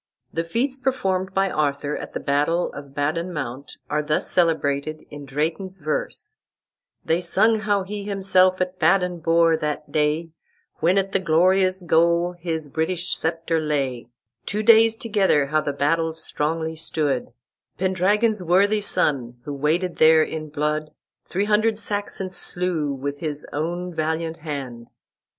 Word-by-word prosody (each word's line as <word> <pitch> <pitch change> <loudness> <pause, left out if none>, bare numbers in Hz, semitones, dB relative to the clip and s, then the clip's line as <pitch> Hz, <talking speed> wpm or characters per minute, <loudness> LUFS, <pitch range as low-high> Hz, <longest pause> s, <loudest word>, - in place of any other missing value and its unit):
The 165 - -1
feats 255 +10 -1
performed 190 -8 -1
by 195 -1 +2
Arthur 145 -1 -1
at - - -7
the - - -3
battle 150 +5 0
of 140 -1 -10
Badon 160 +5 -1
Mount 140 -3 -6
are 150 - 0
thus 150 +1 -1
celebrated 155 -3 0
in 145 -1 -8
Drayton's 165 +7 -2
verse: 170 - -4 0.7
"They 165 +2 +1
sung 220 +6 +3
how 205 -2 +1
he 205 +2 -5
himself 190 -2 +3
at 185 0 -2
Badon 180 +1 +2
bore, 165 0 +4
that 150 0 -4
day, 155 +2 0 0.5
When 175 +4 +2
at 195 0 +1
the 195 - +2
glorious 185 +2 +3
goal 170 +1 +3
his 165 -3 -4
British 165 +5 -1
sceptre 165 0 -1
lay; 135 -6 -2 0.4
Two 210 +1 -1
daies 225 0 +6
together 200 -10 +2
how 155 +2 +1
the 145 - -2
battel 160 +3 0
stronglie 160 +1 -3
stood; 150 -5 -1 0.5
Pendragon's 195 +4 +1
worthie 200 +5 +3
son, 125 -11 0
who 145 - -4
waded 160 +5 0
there 160 0 +6
in 155 -1 -5
blood, 150 +1 -1 0.4
Three 195 +3 -1
hundred 215 +1 +2
Saxons 205 -3 -3
slew 175 -6 -1
with 140 +1 -4
his 150 -3 -4
owne 175 +4 -3
valiant 160 +1 -2
hand." 135 -7 -6
165 Hz, 145 wpm, -23 LUFS, 150-190 Hz, 0.7 s, daies